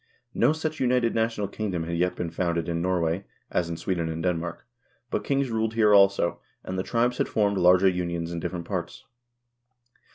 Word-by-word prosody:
No - - +3
such 155 0 -3
united 125 -2 +2
national 110 -2 0
kingdom 95 -4 -3
had 85 +1 -3
yet 90 +2 +1
been 85 -2 -4
founded 85 -1 -1
in 85 -1 -1
Norway 90 0 0 0.3
as 85 -1 0
in 85 - -4
Sweden 85 -3 -2
and 80 0 -4
Denmark, 85 -1 -2 0.5
but - - -1
kings 135 -2 0
ruled 110 0 -1
here 105 -2 +4
also, 100 -3 +4 0.2
and 95 - -5
the 95 - 0
tribes 120 +4 0
had - - +1
formed 100 -2 +1
larger 90 +2 +5
unions 85 -2 -1
in 85 - -3
different 85 0 -4
parts. 90 +3 -5
90 Hz, 185 wpm, -26 LUFS, 85-110 Hz, 0.5 s, larger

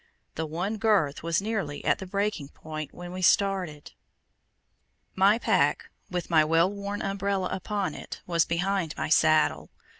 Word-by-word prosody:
The 160 0 -3
one 180 +8 -3
girth 200 -10 +2
was 170 +3 0
nearly 200 -10 -3
at - - +2
the 190 - -7
breaking 200 -5 -2
point 155 -1 -7
when 175 0 -9
we 185 +1 -6
started. 185 -6 +1 1.2
My 195 +3 +4
pack, - - +1 0.2
with 180 -1 -3
my 160 -2 +6
well 165 +4 +3
worn 200 0 -5
umbrella 195 -1 -1
upon 195 -3 -2
it, - - -8
was 170 -2 +2
behind 175 -1 -1
my - - -2
saddle. 155 - +3
180 Hz, 150 wpm, -27 LUFS, 160-200 Hz, 1.2 s, my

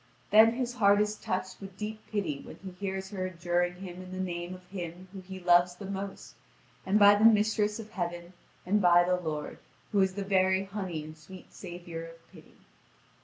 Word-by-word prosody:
Then 220 +2 +7
his 245 0 -2
heart 205 -4 +4
is 210 0 +1
touched 185 -1 -4
with 195 -1 -10
deep 215 +1 -5
pity 195 -10 -2
when - - -10
he 190 - -6
hears 190 +1 -5
her 185 -2 -2
adjuring 175 0 -1
him 180 -1 -8
in 185 - -10
the 185 - -5
name 175 -1 -4
of 185 0 -15
him 180 -1 -7
whom 195 - -7
he 190 +1 -9
loves 175 0 +4
the 195 - -9
most, 195 0 -6 0.5
and 195 +2 +4
by 205 -1 +8
the 205 +1 +2
mistress 210 -1 +4
of 220 -1 -9
heaven, 175 -1 -4 0.3
and 205 +3 +2
by 175 -1 +6
the 180 +1 +1
Lord, 155 -3 -4 0.3
who 200 - +3
is 190 -1 +1
the 200 -1 -3
very 190 -1 +3
honey 190 -5 -5
and 155 +1 -10
sweet 165 +4 -14
savour 175 -2 -7
of 165 0 -15
pity. - - -17
185 Hz, 200 wpm, -29 LUFS, 175-200 Hz, 0.5 s, by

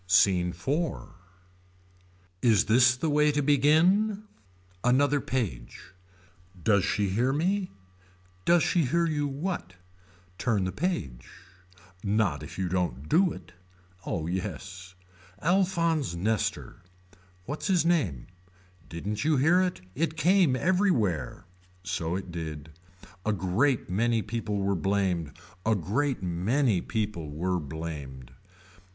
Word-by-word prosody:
SCENE 90 -2 +4
IV. 150 - -2 1.3
Is 115 -4 +4
this 125 +3 +5
the 145 - -1
way 150 0 +4
to 145 0 0
begin. 170 +10 +3 0.6
Another 140 +3 +3
page. 90 - -4 0.7
Does 100 -1 +3
she 100 +2 0
hear 120 +7 +1
me. 185 +6 0 0.7
Does 170 - +4
she 170 -4 +2
hear 170 +7 +1
you 150 -3 0
what. 140 - -4 0.6
Turn 110 -6 +1
the 95 - -1
page. 90 - -3 0.7
Not 100 -7 +1
if 75 - -9
you 95 -1 -1
don't 85 -7 -2
do 180 +1 +4
it. - - -10 0.5
Oh 80 -4 -3
yes. 90 +1 -5 0.4
Alphonse 170 - +1
Nester. 105 +4 -2 0.6
What's 145 +8 -4
his 180 -5 +2
name. 115 - +1 0.6
Didn't 100 +7 -4
you 155 -1 +2
hear 160 +7 +4
it. 180 - -1
It 160 - -2
came 175 -4 +4
everywhere. 130 - 0 0.4
So 90 -2 -2
it 95 -1 -5
did. 80 -3 -6 0.5
A 110 - +1
great 105 - +1
many 110 +4 +1
people 105 -1 -3
were 100 0 0
blamed. 95 -4 -1 0.3
A 110 0 +2
great 115 - -1
many 95 +5 +1
people 105 -8 -3
were 90 +5 -1
blamed. 75 -4 -7
110 Hz, 120 wpm, -28 LUFS, 90-150 Hz, 1.3 s, this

